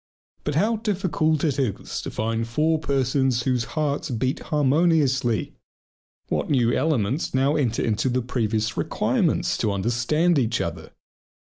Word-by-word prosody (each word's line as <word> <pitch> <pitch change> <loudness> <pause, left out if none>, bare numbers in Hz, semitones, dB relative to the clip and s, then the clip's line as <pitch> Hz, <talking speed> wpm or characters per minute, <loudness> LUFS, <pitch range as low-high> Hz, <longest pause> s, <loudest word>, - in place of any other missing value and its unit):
But 150 - -2
how 215 +8 +2
difficult 175 -8 0
it 145 -4 0
is 125 -8 -2
to - - -5
find 115 +1 -2
four 155 +7 +1
persons 135 -3 +1
whose 125 -2 0
hearts 150 -1 -1
beat 130 +2 -1
harmoniously! 145 -5 +1 0.7
What - - -2
new 125 -5 +2
elements 135 -2 0
now 135 +3 +2
enter 125 -7 0
into 115 +3 0
the 125 0 0
previous 110 -2 -1
requirements - - 0
"to 105 - +1
understand 120 - +1
each 115 -2 0
other!" 80 -1 -5
130 Hz, 135 wpm, -24 LUFS, 115-155 Hz, 0.7 s, how